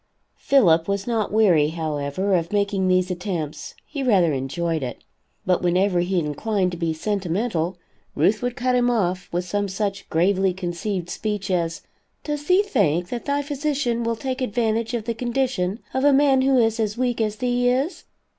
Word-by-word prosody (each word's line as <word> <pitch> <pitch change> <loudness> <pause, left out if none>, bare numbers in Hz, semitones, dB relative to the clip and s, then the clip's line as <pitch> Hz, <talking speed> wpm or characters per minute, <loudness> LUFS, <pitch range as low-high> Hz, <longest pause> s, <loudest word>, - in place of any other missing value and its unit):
Philip 170 -12 +4
was 200 0 -1
not 225 -4 -1
weary, 185 -9 +4
however, 155 +3 -2
of 170 -1 0
making 200 -2 +1
these 185 0 +2
attempts, 175 -5 -4
he 290 -2 -5
rather 190 - +3
enjoyed 155 +5 -2
it. 125 -2 -6 0.4
But 180 -1 +2
whenever 180 +1 +2
he 180 +2 0
inclined 180 +5 0
to 175 - -6
be 165 -2 0
sentimental, 180 0 -2 0.4
Ruth 215 +2 +2
would 245 -1 -2
cut 255 +1 0
him 245 0 +3
off, 185 -6 0
with 175 +1 -1
some 205 +3 -1
such 200 0 -3
gravely 190 +3 +2
conceived 180 0 -3
speech 210 -3 -3
as, 165 -2 -1 0.4
"Does 295 -1 -4
thee 370 +3 +5
think 180 - +1
that 240 - -5
thy 285 0 0
physician 280 -4 -1
will 230 0 0
take 260 +3 -4
advantage 230 -1 0
of 230 - -2
the 230 - -1
condition 240 -5 -1 0.2
of 260 - 0
a 290 - +6
man 275 -1 +4
who 265 0 +3
is 225 -1 +2
as 215 0 -1
weak 245 -2 0
as 215 -1 0
thee 245 +2 +1
is? 270 +8 -1
205 Hz, 175 wpm, -23 LUFS, 175-245 Hz, 0.4 s, a